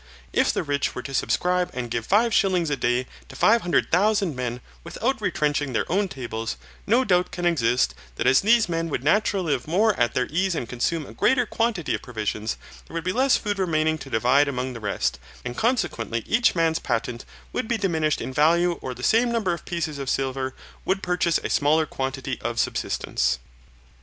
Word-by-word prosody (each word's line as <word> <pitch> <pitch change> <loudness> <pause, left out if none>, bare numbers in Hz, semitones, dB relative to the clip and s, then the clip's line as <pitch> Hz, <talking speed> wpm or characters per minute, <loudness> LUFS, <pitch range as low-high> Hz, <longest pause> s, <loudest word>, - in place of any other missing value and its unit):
If - - +3
the - - -2
rich 145 -2 -1
were 125 - -5
to 135 - -7
subscribe 180 +10 +1
and 120 -2 -4
give 115 0 -2
five 220 +3 +3
shillings 180 -5 +2
a - - +2
day 120 0 0 0.2
to - - -11
five 230 +2 +4
hundred 175 -2 +1
thousand 200 -2 +2
men 125 -1 -3 0.2
without - - -2
retrenching 145 -2 0
their - - +1
own 200 +2 +2
tables, 120 -7 -5 0.3
no 235 +5 +4
doubt 180 -3 +2
can 175 - -4
exist, 125 -8 +2 0.2
that - - -2
as 135 - +5
these 225 +2 +4
men 165 -1 -2
would 130 - -3
naturally 185 -1 +2
live 130 0 -3
more 205 +7 +3
at 120 -1 +2
their 125 - +2
ease 185 +2 +1
and 120 - -3
consume 145 +6 -1
a - - -11
greater 255 -2 +2
quantity 225 -8 -1
of - - -2
provisions, 110 -2 -3 0.3
there - - -11
would 165 - -2
be 185 - -1
less 260 +2 +3
food 205 -2 -3
remaining 160 -3 +1
to 135 - -9
divide 130 +5 +3
among 130 -1 -3
the 115 - -7
rest, 100 - -1 0.3
and 120 0 -4
consequently 175 - -1
each 230 -2 +2
man's 165 -1 +2
patent 120 0 -2 0.3
would 250 - -2
be 235 - 0
diminished 160 -7 0
in 130 - -5
value 170 +4 +3
or 125 - -5
the 125 - -10
same 235 - +3
number 215 -7 0
of 170 - -7
pieces 160 -4 -3
of 135 -1 -3
silver 130 -1 -1 0.3
would 195 +1 -1
purchase 180 -2 +1
a - - -1
smaller 155 +2 +3
quantity 135 -2 -4
of 120 +1 -3
subsistence. 60 0 0
155 Hz, 200 wpm, -24 LUFS, 125-185 Hz, 0.3 s, as